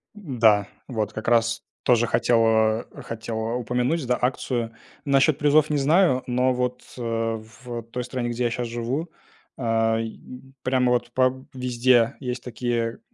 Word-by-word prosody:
Да, 115 - +2 0.2
вот 110 -4 -2
как 110 - -6
раз 115 0 +2 0.2
тоже 120 -1 +3
хотел, 115 0 +3
а, 110 0 +2 0.2
хотел, 115 0 -5
а, 115 +2 -2
упомянуть, 125 +5 0
да, 125 0 +2
акцию. 125 -2 -1 0.3
Насчёт 140 +1 +3
призов 150 +1 +4
не 150 - +1
знаю, 145 -1 +3
но 125 +1 +2
вот, 125 0 -2 0.2
э, - - -6 0.6
в 120 -2 -5
той 125 +1 -3
стране, 120 -1 -3
где 120 +1 -1
я 120 - +2
щас 120 +1 -3
живу, 120 +8 -3 0.5
ай, 115 -1 0 0.4
прямо 130 -1 +2
вот 120 0 0
по 130 +1 +1
везде 125 -2 +2
есть 125 -2 -4
такие, 120 -2 -2
120 Hz, 150 wpm, -24 LUFS, 115-130 Hz, 0.6 s, призов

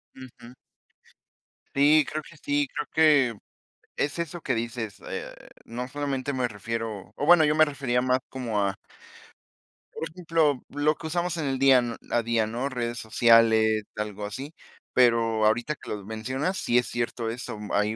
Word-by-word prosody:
Ujú. 125 -2 -13 1.2
Sí, 150 +2 +5
creo 155 +1 -2
que 155 - -15
sí, 145 -1 +1
creo 150 - -5
que 145 -8 +4 0.6
es 145 +4 -1
eso 170 +1 -4
que 130 - 0
dices, 115 -2 -4
eh, - - -5 0.3
no 125 +2 -5
solamente 140 -1 -3
me 130 -2 0
refiero 115 -1 -5
o 145 - -2
bueno, 170 -2 +7
yo 150 +1 +2
me 155 - +7
refería 135 -4 -1
más 130 0 +1
como 115 -6 -2
a 100 -1 0 1.2
por 160 - -5
ejemplo, 160 -5 +1
lo 145 +1 +1
que 160 - -7
usamos 175 +1 -1
en 155 - -2
el 135 -1 -1
día 125 -4 +4
a 120 - +2
día, 115 -2 +1
¿no?, 120 +5 -3
redes 120 -2 -3
sociales, 110 -1 +4
algo 105 -1 -4
así, 135 +9 -6 0.4
pero 115 -3 +3
ahorita 120 +7 +1
que - - -13
lo 100 -2 -5
mencionas, 130 - -3
sí 120 - +1
es 125 - +2
cierto 120 -1 -2
eso. 115 -2 -5 0.2
Hay 105 +2 +1
125 Hz, 165 wpm, -26 LUFS, 115-145 Hz, 1.2 s, bueno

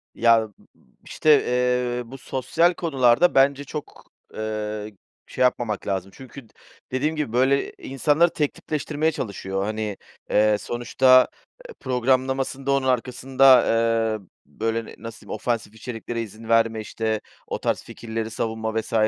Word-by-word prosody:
Ya, 115 -1 +5
ııı, 110 - +1
ııı, 105 - -16 0.5
işte, 150 -2 +3
eee, 125 0 0
bu 135 - -8
sosyal 145 +7 +1
konularda 140 -1 +3
bence 140 +1 +4
çok, 145 +1 -9 0.2
ııı, 110 -1 -4 0.4
şey - - -6
yapmamak 120 -5 +1
lazım. 95 0 -2
Çünkü 130 -2 -12
d - - -30 0.4
dediğim 145 +5 0
gibi 150 -7 -3
böyle 135 +3 +2
insanları 150 +5 +2
tek 150 -3 0
tipleştirmeye 155 +1 -2
çalışıyor. 95 -6 -4
Hani, 105 -1 -3 0.3
eee, 105 0 +3
sonuçta, 130 +2 +4 0.4
eee, 470 - -10
programlamasında 130 +2 0
onun 135 -1 +1
arkasında, 130 +1 +4
eee, 115 -2 +1 0.2
böyle, 115 +9 -3
ne - - -11
nasıl 115 0 -9
diyeyim, - - -6
ofansif 115 -3 -3
içeriklere 115 +1 -5
izin 110 +1 -9
verme, 115 -1 +3
işte, 110 0 -2 0.3
o - - -4
tarz - - -1
fikirleri 110 -1 -5
savunma 110 0 -2
vs. 110 - -11
120 Hz, 140 wpm, -23 LUFS, 110-135 Hz, 0.5 s, Ya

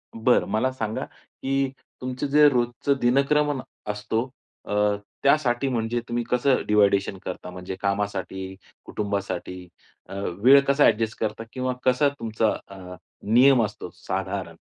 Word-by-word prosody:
बरं 115 +2 +3
मला 120 +5 +1
सांगा 110 -4 -3
की 135 0 -3 0.3
तुमचं 130 +2 -3
जे 150 +1 +6
रोजचा 120 +1 0
दिनक्रमन 140 +3 +2 0.3
असतो 110 +4 -2 0.4
अ, - - -8 0.5
त्यासाठी 135 -2 +2
म्हणजे 120 -1 -1
तुम्ही 120 0 -1
कसं 125 +2 +2
डिव्हायडेशन 100 -2 +3
करता 90 0 -6
म्हणजे 90 +1 -7
कामासाठी 100 -1 -3 0.3
कुटुंबासाठी 95 -3 -4 0.4
अ, - - -8
वेळ 100 +8 +4
कसा 140 +1 +4
ॲडजस्ट 110 0 +1
करता 110 +1 -2
किंवा 130 -1 -2
कसा 130 +3 +3
तुमचा 110 -1 0 0.2
अ, 90 -2 -10 0.4
नियम 130 0 +6
असतो 105 -4 -5
साधारण? 95 -2 -4
115 Hz, 125 wpm, -24 LUFS, 100-130 Hz, 0.5 s, जे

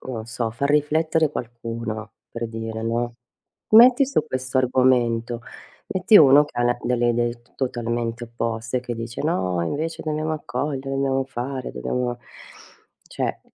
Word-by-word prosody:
non 115 -4 -6
so, 115 -1 -3
far 140 +5 -2
riflettere 155 +1 +2
qualcuno 115 -3 -5 0.2
per 115 0 -4
dire, 115 0 -5
no, 120 +1 -1 0.6
metti 245 +5 +8
su 270 - +1
questo 130 -1 -2
argomento, 120 -2 +2 0.5
metti 190 +3 +4
uno 145 0 +7
che 135 - -9
ha - - +2
la 120 0 +2
delle 120 -1 +1
idee 120 0 0
totalmente 120 -2 -2
opposte, 115 +1 -3
che 120 -1 -5
dice: 115 0 -5
"No, 95 - 0
invece 160 - -3
dobbiamo 155 0 -2
accogliere, 135 -1 -3
dobbiamo 135 -1 0
fare, 130 0 -5
dobbiamo" 125 -1 -2 0.9
cioè - - -3
125 Hz, 135 wpm, -23 LUFS, 115-140 Hz, 0.9 s, metti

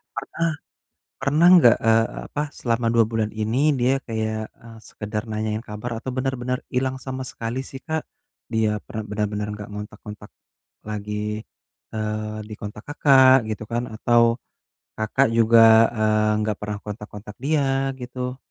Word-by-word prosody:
pernah 165 - -2 0.7
pernah 150 +5 +4
nggak, 120 -9 +7
eee, 115 0 +5 0.2
apa 145 - -3 0.2
selama 115 -1 0
2 115 -1 +5
bulan 110 -2 0
ini 110 +3 0 0.2
dia 125 +2 +3
kayak, 110 -1 -2 0.2
eee, 115 -1 -12
sekedar 105 0 -4
nanyain 110 +1 -2
kabar 105 +3 -5
atau 130 +3 -5
bener-bener 130 -1 -1 0.2
ilang 130 +1 +1
sama 130 0 -4
sekali 115 +3 -4
sih 135 - -8
Kak? 160 0 -1 0.5
Dia 110 -1 +2 0.2
per - - -12
bener-bener 105 0 -2
nggak 105 -1 -8
ngontak-ngontak 105 0 -9 0.6
lagi, 105 0 -4 0.8
eee, 110 0 -3
dikontak 105 0 -8
Kakak 135 -3 +6
gitu 110 0 -4
kan 120 +1 0
atau 120 +1 +4 0.7
Kakak 110 +5 +2
juga, 115 0 +6 0.4
eee, 110 0 +2
nggak 105 -1 -1
pernah 105 0 -4
kontak-kontak 105 0 -8
dia, 135 -2 +1
gitu? 125 +1 -5
115 Hz, 135 wpm, -23 LUFS, 105-130 Hz, 0.8 s, nggak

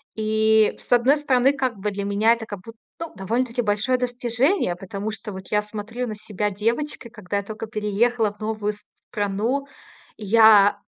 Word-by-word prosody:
И 220 0 +3
с - - -18
одной 245 +4 +5
стороны, 270 -2 +3
как 260 -5 -2
бы 210 +2 -2
для 200 0 -4
меня 205 +3 +3
это 230 -1 -5
как 205 -3 -7
бу 225 +4 -11 0.3
ну, 330 0 -6
довольно-таки 235 +5 -1
большое 215 +4 +1
достижение. 245 - 0
Потому 195 +4 -5
что 215 0 -7
вот 190 -1 -9
я 210 -1 +2
смотрю 215 +4 -5
на 215 - -5
себя 210 0 -3
девочкой, 235 +6 -2
когда 205 -3 -4
я 200 - -2
только 215 +2 -7
переехала 215 +1 0
в 205 - -29
новую 215 -1 -2 0.4
страну. 210 +7 -1 0.5
Я 210 -1 +6
220 Hz, 170 wpm, -23 LUFS, 205-245 Hz, 0.5 s, Я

